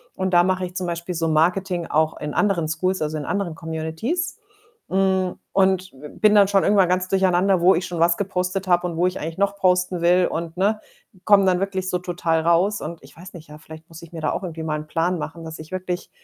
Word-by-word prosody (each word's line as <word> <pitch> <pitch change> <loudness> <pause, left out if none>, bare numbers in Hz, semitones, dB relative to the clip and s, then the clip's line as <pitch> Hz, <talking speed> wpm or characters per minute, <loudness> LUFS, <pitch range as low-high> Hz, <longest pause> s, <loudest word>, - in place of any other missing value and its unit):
Und 190 0 -2
da 175 - +7
mache 185 0 0
ich 180 - -9
zum 185 -1 -3
Beispiel 170 +1 -4
so 165 0 -1
Marketing 175 +2 +1
auch 155 +1 +1
in 150 0 -5
anderen 185 -6 +1
Skools, 185 +3 -1
also, 155 0 -2
in 145 - -5
anderen 200 -5 -2
Communities, 160 - -3 0.5
hm, 190 -1 +1 0.2
und 190 -1 +2
b 140 +3 -11
bin 215 -1 +5
dann 200 -1 +6
schon 195 -1 +2
irgendwann 195 -3 +4
ganz 185 0 +1
durcheinander, 190 0 +2
wo 185 +2 +5
ich 175 +3 -2
schon 175 -2 -5
was 170 +1 +4
gepostet 190 -1 -2
habe 175 0 +3
und 170 - -5
wo 175 - +2
ich 185 - -4
eigentlich 165 +3 -5
noch 200 0 0
posten 185 -1 +1
will 180 +1 +4
und, 165 0 -4
ne, 210 +3 +1 0.5
komme 205 -2 +6
dann 180 -1 +2
wirklich 190 -1 -2
so 180 - 0
total 175 -2 -1
raus. 180 +5 +2
Und 165 +1 -7
ich - - -16
weiß 185 +3 -12
nicht, 160 -4 -12
ja, 150 - -11
vielleicht 160 +1 -13
muss 165 0 -12
ich 170 0 -14
mir 160 - -6
da - - 0
auch 195 - -4
irgendwie 165 -2 -6
mal 155 -1 -2
'n 155 - -9
Plan 170 +3 0
machen, 165 +2 -6
dass 160 -1 -8
ich 155 +3 -11
wirklich 180 -1 -4
180 Hz, 240 wpm, -22 LUFS, 165-190 Hz, 0.5 s, da